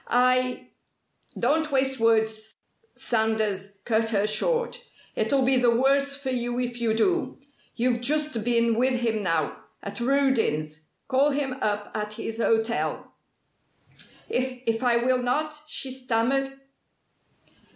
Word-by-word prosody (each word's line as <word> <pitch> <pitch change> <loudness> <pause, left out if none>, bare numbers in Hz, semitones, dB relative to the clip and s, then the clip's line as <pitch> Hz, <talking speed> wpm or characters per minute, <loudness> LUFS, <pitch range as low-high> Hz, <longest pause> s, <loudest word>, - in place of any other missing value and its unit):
I 255 +1 +2 0.3
" - - -47
"Don't 315 0 +1
waste 265 -1 +1
words," 220 -1 +1 0.4
Sanders 215 -3 -1
cut 225 -1 +1
her 205 -2 +1
short. 475 - 0 0.3
"It'll 275 -1 +1
be 260 +1 +3
the 245 -1 +4
worse 275 +4 +3
for 265 -2 -3
you 245 -1 -2
if 240 -1 -3
you 225 -2 +1
do. 350 +10 0 0.4
You've 240 0 +1
just 295 -3 0
been 235 0 +2
with 250 -1 +2
him 225 -2 0
now, 165 -5 -1 0.2
at 200 - -6
Rudin's. 225 - 0 0.2
Call 275 +2 +3
him 275 -2 -1
up 210 -1 -1
at 210 0 -4
his 225 +1 -5
hotel." 225 0 0 1.1
"If 255 0 -2
if 225 0 0
I 245 -2 +3
will 250 +1 +1
not?" 300 +5 -1
she 270 -3 -3
stammered. 260 +2 -1
245 Hz, 130 wpm, -25 LUFS, 220-265 Hz, 1.1 s, the